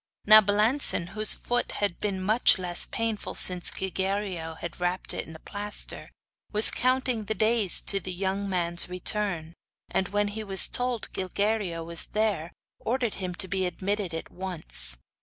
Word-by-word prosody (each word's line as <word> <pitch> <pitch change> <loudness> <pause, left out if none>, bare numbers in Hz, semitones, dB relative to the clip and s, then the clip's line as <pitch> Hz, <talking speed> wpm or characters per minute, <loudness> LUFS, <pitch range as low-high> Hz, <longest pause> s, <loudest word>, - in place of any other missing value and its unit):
Now 215 +1 +9
Balancin, 210 -2 +1
whose 215 +1 +2
foot 245 0 -3
had 200 -4 -2
been 200 -2 -3
much 215 +4 +5
less 180 -2 +1
painful 225 -2 -4
since 180 -1 +2
Gilguerillo 190 -3 -3
had 170 +2 -8
wrapped 180 +1 -2
it - - -5
in 160 - -11
the 160 - -12
plaster, 205 +3 -4 0.4
was 210 +1 +7
counting 255 -3 0
the 220 +2 -3
days 215 -4 +2
to 195 - +2
the 185 0 -7
young 195 +2 -3
man's 175 -2 +1
return; 180 -3 +2 0.4
and 190 - -1
when 205 +1 -1
he 215 +1 -6
was 195 -2 +4
told 245 -2 -1
Gilguerillo 190 -2 -2
was 170 0 -4
there, 205 -6 -1 0.3
ordered 240 -2 -2
him 180 -1 -4
to 190 - +1
be 190 0 -1
admitted 195 +1 -3
at 165 - -7
once. 65 - +1
195 Hz, 160 wpm, -26 LUFS, 180-215 Hz, 0.4 s, Now